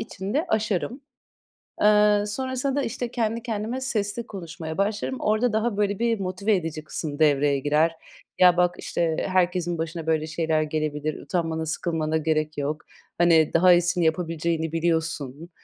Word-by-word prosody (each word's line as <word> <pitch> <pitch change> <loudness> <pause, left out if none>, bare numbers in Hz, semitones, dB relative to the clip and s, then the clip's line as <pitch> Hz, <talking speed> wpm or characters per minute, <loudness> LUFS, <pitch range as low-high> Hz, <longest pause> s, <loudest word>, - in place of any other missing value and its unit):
içinde 225 - -3
aşarım. 220 +4 -1 0.8
Eee, 210 0 +5
sonrasında 260 +4 -2
da, 285 - +1
işte, 240 0 -4
kendi 230 -1 -1
kendime 230 +2 -3
sesli 230 -2 -2
konuşmaya 165 -4 -7
başlarım. 210 +6 -1
Orada 215 +2 +1
daha 220 -1 0
böyle 205 -1 0
bir 230 -2 +1
motive 195 +3 0
edici 160 -3 -4
kısım 150 -2 -5
devreye 145 -2 +3
girer. 155 +4 +2 0.4
"Ya, 180 -1 +6
bak, 180 0 +3
işte, 165 -2 -1
herkesin 180 -2 +1
başına 165 0 -4
böyle 160 -1 +1
şeyler 160 -1 0
gelebilir. 155 0 -3
Utanmana, 160 +1 -2
sıkılmana 160 0 -1
gerek 155 -1 -1
yok. 150 +2 -2 0.4
Hani, 165 -2 +4
daha 180 +2 +6
iyisini 175 0 +2
yapabileceğini 160 -1 -1
biliyorsun." 160 -2 -2
175 Hz, 140 wpm, -25 LUFS, 160-210 Hz, 0.8 s, Ya